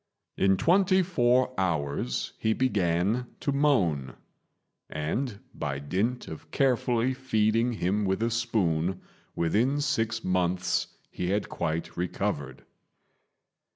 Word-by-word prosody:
In 95 0 +3
twenty 185 - +4
four 130 -7 +2
hours 70 -8 -1
he 110 - +2
began 105 0 +1
to 140 - -1
moan; 100 - +1 0.7
and 100 - -2
by 70 -2 -3
dint 95 - -2
of 80 0 -9
carefully 125 - +1
feeding 115 -2 +1
him 100 0 0
with 95 +3 0
a 115 - +1
spoon, 95 -7 0 0.4
within 115 - +1
six 115 -6 0
months 90 -1 0 0.2
he 90 - -3
had 100 +2 0
quite 80 +1 -3
recovered. 85 -6 -3
105 Hz, 110 wpm, -28 LUFS, 85-125 Hz, 0.7 s, twenty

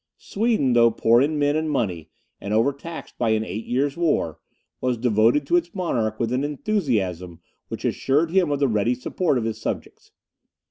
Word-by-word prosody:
Sweden, 210 - 0
though 120 -1 +6
poor 115 +1 +3
in 150 +2 +1
men 145 0 +2
and 155 0 -1
money, 95 - -2 0.3
and 100 +2 -3
overtaxed 140 +8 -2
by 120 - +1
an 110 0 +1
eight 105 +5 -6
years' 135 +3 0
war, 155 - 0 0.4
was 125 -1 0
devoted 115 +4 +2
to 175 - +3
its 175 +1 -3
monarch 115 - -1
with 115 +1 -1
an 130 +2 0
enthusiasm 110 - -2 0.3
which - - -6
assured 155 +5 +1
him 185 -3 +3
of 145 - 0
the 140 0 +2
ready 115 +1 +1
support 140 +4 -1
of 120 - -1
his 110 -1 -4
subjects. - - -5
125 Hz, 180 wpm, -23 LUFS, 110-150 Hz, 0.4 s, though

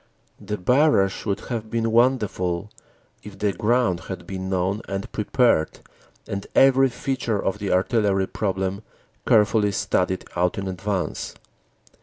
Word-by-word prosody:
The 105 - -4
barrage 125 - +2
would 100 - -1
have 110 -3 -5
been 115 0 0
wonderful 105 -6 +1 0.5
if 105 -2 -11
the 100 0 0
ground 110 -1 +1
had 95 - -6
been 95 -1 -5
known 95 +3 0
and 95 0 -4
prepared 105 -6 +1 0.5
and 100 0 -5
every 135 0 +5
feature 125 -3 -2
of 95 +1 -2
the 100 -2 -2
artillery 95 0 +2
problem 95 -1 -2 0.5
carefully 105 -1 +4
studied 95 -1 -1
out 90 0 +1
in 100 -1 -3
advance. 95 0 -3
100 Hz, 130 wpm, -23 LUFS, 95-115 Hz, 0.5 s, every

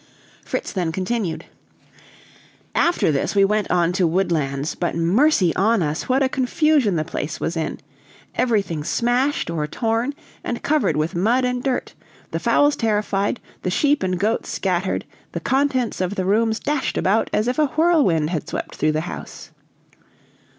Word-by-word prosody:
Fritz - - -4
then 175 -4 -1
continued: 190 0 -2 1.3
"After 340 - +2
this 140 +7 -1
we 200 -1 +5
went 210 0 0
on 175 -1 +2
to 180 -2 +2
Woodlands; 160 -5 0
but 175 - -2
mercy 185 - +3
on 215 0 +3
us! 150 +8 -3
what 265 +2 +3
a - - +3
confusion 265 - +2
the 155 -1 0
place 155 -1 -4
was 170 - -2
in! 160 -1 -3 0.5
Everything 200 -10 0
smashed 245 - 0
or 155 -2 -2
torn, 230 - -1 0.3
and 240 - -4
covered 305 - +1
with 155 +2 0
mud 230 +9 +2
and 250 0 -1
dirt; 260 -1 -2 0.4
the - - -2
fowls 290 0 +3
terrified, 210 -1 0 0.2
the 185 - -1
sheep 290 +10 +2
and 185 -1 -1
goats 215 +4 0
scattered, 185 -1 -1 0.3
the - - -2
contents 260 -6 0
of 185 +2 -1
the 185 - -1
rooms 220 +3 +2
dashed 290 -2 -1
about 210 +4 +2
as 215 - +1
if 255 +5 0
a 305 - +4
whirlwind 280 - +2
had 160 -4 -3
swept - - -4
through 155 +1 +1
the 155 - 0
house." 170 - -8
205 Hz, 160 wpm, -22 LUFS, 170-255 Hz, 1.3 s, we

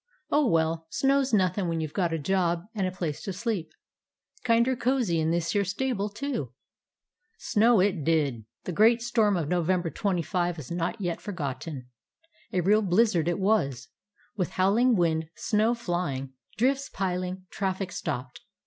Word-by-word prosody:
Oh, 295 -2 +3
well, 165 -3 +1
snow 275 +8 +2
's 265 - -3
nothin' 190 -2 +2
when 165 -1 -1
you 160 - -1
've 150 - -17
got 175 -4 0
a 165 - 0
job 170 +1 0
and 195 -4 0
a - - -3
place 170 -5 -4
to 195 - -4
sleep. 200 -2 -3 0.7
Kinder 235 +2 +3
cozy 240 -8 +1
in 160 0 +1
this 170 0 0
here 200 +1 +2
stable, 205 +1 -1
too." 210 - -4 0.8
Snow 225 0 +3
it 185 -4 +1
did. 140 -8 +1 0.2
That - - -4
great 230 +5 +4
storm 225 -5 +2
of 160 -4 -2
Novem 180 +1 +1
ber 165 - -3
25 175 -3 -1
is 150 -2 -8
not 175 +5 -2
yet 175 -4 -3
forgotten. 145 - -5 0.7
A 180 - +1
real 210 +5 +4
blizzard 190 -3 +2
it 175 - +1
was, 140 - 0 0.5
with 185 -5 0
wind 220 +6 +4
howling, 160 -2 +1
snow 220 +3 +1
flying, 175 - -3 0.2
drifts 270 +4 +1
piling, 185 0 -3
traffic 190 -1 -2
stopped. 130 -5 -5
185 Hz, 165 wpm, -27 LUFS, 165-215 Hz, 0.8 s, great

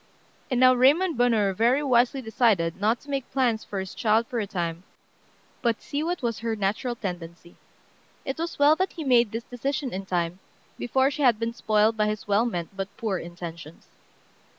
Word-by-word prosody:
And 255 -3 0
now 255 0 +7
Raymond 295 +8 +4
Bonheur 225 -5 +2
very 240 +8 +2
wisely 255 0 +2
decided 210 -7 +1
not 220 +3 +2
to 290 - -16
make 270 -2 -3
plans 245 -5 +1
for 200 - -5
his 190 -1 -6
child 220 +1 +2
for 235 0 -3
a 210 - -2
time, 170 -4 -3 0.8
but 235 -2 +1
see 285 - -4
what 340 -2 -2
was 230 -3 -1
her 225 0 -2
natural 215 +5 -1
tendency. 175 -4 -7 0.7
It 270 +3 -4
was 335 +1 -3
well 290 +2 +5
that 375 +1 -1
he 325 - -6
made 240 -5 +3
this 230 +1 -4
decision 270 +2 -3
in 190 +1 -5
time, 175 0 -1 0.4
before 265 +3 +2
she 295 - -5
had 245 -5 +4
been 230 +1 -2
spoiled 215 0 +2
by 210 0 +2
his 210 -1 -4
well 205 +4 +2
meant 175 -3 -5
but 195 0 -4
poor 205 -5 -2
intentions. 170 -2 -9
230 Hz, 190 wpm, -26 LUFS, 195-255 Hz, 0.8 s, now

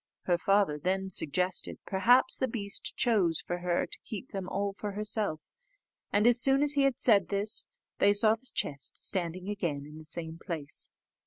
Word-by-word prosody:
Her 175 -1 +1
father 195 -6 +2
then 190 +3 -1
suggested, 180 +3 -1
perhaps 245 +7 +4
the 260 - 0
beast 210 -4 -4
chose 195 -10 +2
for 175 - -4
her 175 0 0
to - - -8
keep 225 +4 -7
them 190 -2 -5
all 200 0 -2
for 205 0 -6
herself: 210 -6 -3 0.6
and 205 +1 +2
as 240 0 +5
soon 270 +2 +4
as 295 0 +4
he 285 - +2
had 275 -3 +1
said 210 -5 +4
this, 205 +2 +1 0.3
they 205 - +5
saw 215 +1 +6
the 245 +3 -2
chest 140 -1 -2
standing 180 0 -3
again 170 -9 -3
in 150 +1 -11
the - - -11
same 160 +1 -7
place. 160 -6 -5
195 Hz, 180 wpm, -29 LUFS, 175-220 Hz, 0.6 s, saw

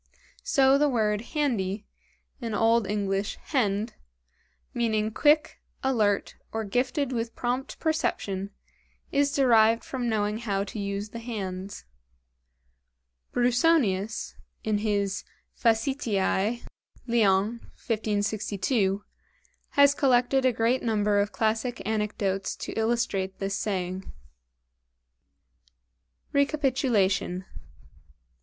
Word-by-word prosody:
So 270 0 +4
the 295 0 +4
word 215 -4 +1
handy, 215 -9 0 0.5
in 230 -4 -3
old 225 0 +3
English 200 0 -1
hend, 220 -5 0 0.8
meaning 220 -2 0
quick, 300 +6 +3 0.2
alert, 215 -7 +1
or 225 0 -2
gifted 250 +6 0
with 230 -2 -3
prompt 250 +2 -3
perception, 200 - -1 0.6
is 285 0 +2
derived 230 -4 +4
from 250 -3 -3
knowing 210 0 0
how 200 -4 -1
to 205 +2 -7
use 200 +1 -3
the 230 - -7
hands. 200 -4 -5 1.5
BRUSONIUS 240 - +2 0.3
("Facetiæ," 215 +2 0 0.4
Lyons, 225 -1 +2
1562) 205 -1 -1 0.7
has 280 0 +7
collected 260 -1 +3
a 255 - +5
great 230 +2 +1
number 210 -2 +2
of 205 +1 0
classic 225 +3 -1
anecdotes 205 -2 -1
to - - -6
illustrate 220 -4 -1
this 195 0 -2
saying. 190 -2 -3 2.2
Recapitulation. 255 - +1
220 Hz, 90 wpm, -27 LUFS, 200-245 Hz, 2.2 s, has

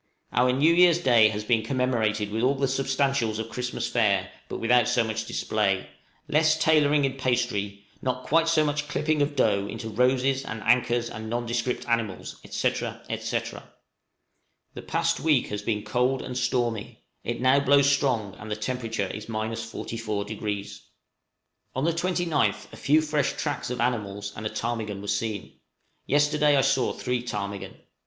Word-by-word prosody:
Our 125 +1 +4
new 145 +6 +4
year's 175 -1 +6
day 120 -9 +5
has 105 0 -4
been 115 +1 +2
commemorated 110 -4 0
with 110 +1 -1
all 130 +3 +3
the 135 0 0
substantials 135 -3 0
of 110 0 -4
Christmas 125 -1 -3
fare, 100 -6 +1 0.2
but - - -4
without 120 0 +3
so 125 -1 +3
much 110 0 -3
display, 100 -3 0 0.4
less 155 +1 +3
tailoring 150 -2 +4
in 135 0 -3
pastry, 115 -6 -1 0.2
not 130 0 -2
quite 165 +2 +3
so 160 -2 +3
much 145 0 -1
clipping 150 +1 0
of 145 0 0
dough 100 -6 +2
into 110 +1 -6
roses, 130 +4 +2
and 110 -3 -6
anchors, 120 0 +2
and 110 -1 -7
nondescript 120 +1 -2
animals, 115 -5 -2
&c., - - +1
&c. - - -3 1.3
The - - -7
past - - 0
week 150 -5 +2
has 105 0 -3
been 105 -1 -2
cold 125 +1 0
and 125 - -6
stormy; 120 -4 -1 0.2
it 120 0 -3
now 130 +3 +4
blows 140 0 +4
strong, 130 -8 +1
and 105 - -8
the 105 - -1
temperature 115 -1 -2
is 105 +3 -7
44°. 110 -2 -4 1.0
On 130 - -1
the 165 +1 +2
29th 175 -2 0
a - - -7
few 155 +3 +3
fresh 150 -3 0
tracks 145 -5 -3
of 125 -1 -4
animals 100 -5 -2
and 110 +1 -3
a - - -4
ptarmigan 110 -4 -3
were 100 - -8
seen: 105 0 -3 0.5
yesterday 150 +1 +3
I - - +5
saw 135 -1 +2
three 125 -1 -2
ptarmigan. 100 -4 -5
120 Hz, 160 wpm, -26 LUFS, 110-140 Hz, 1.3 s, year's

